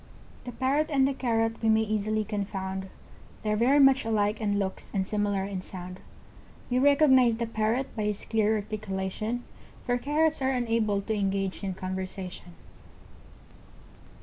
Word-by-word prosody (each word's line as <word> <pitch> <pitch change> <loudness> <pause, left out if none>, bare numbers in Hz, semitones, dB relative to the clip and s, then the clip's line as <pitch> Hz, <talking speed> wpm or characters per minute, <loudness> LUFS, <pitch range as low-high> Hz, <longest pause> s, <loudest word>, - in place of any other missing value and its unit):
] - - -23
The 245 - -5
Parrot 280 +5 0
and 270 -3 +3
the 275 - 0
Carrot 225 -3 0
we 225 - +2
may 220 0 +4
easily 215 0 0
confound, 190 -2 -4 0.5
They're 210 -1 +1
very 245 +6 +4
much 270 -2 +6
alike 215 -1 0
in 205 -1 +1
looks 190 -1 -3
and 190 -1 +1
similar 205 -1 0
in 195 -1 -4
sound, 185 0 -8 0.7
We 250 - +3
recognize 265 -4 +5
the 235 +1 -2
Parrot 225 +3 -1
by 215 -2 -1
his 210 -1 -3
clear 220 -1 +2
articulation, 215 +2 -3 0.4
For 245 0 +1
Carrots 300 +3 +1
are 265 - +2
unable 230 -5 +1
to 220 +2 -2
engage 195 -1 -1
in 190 -2 -3
conversation. 185 -1 -6
215 Hz, 150 wpm, -28 LUFS, 195-245 Hz, 0.7 s, much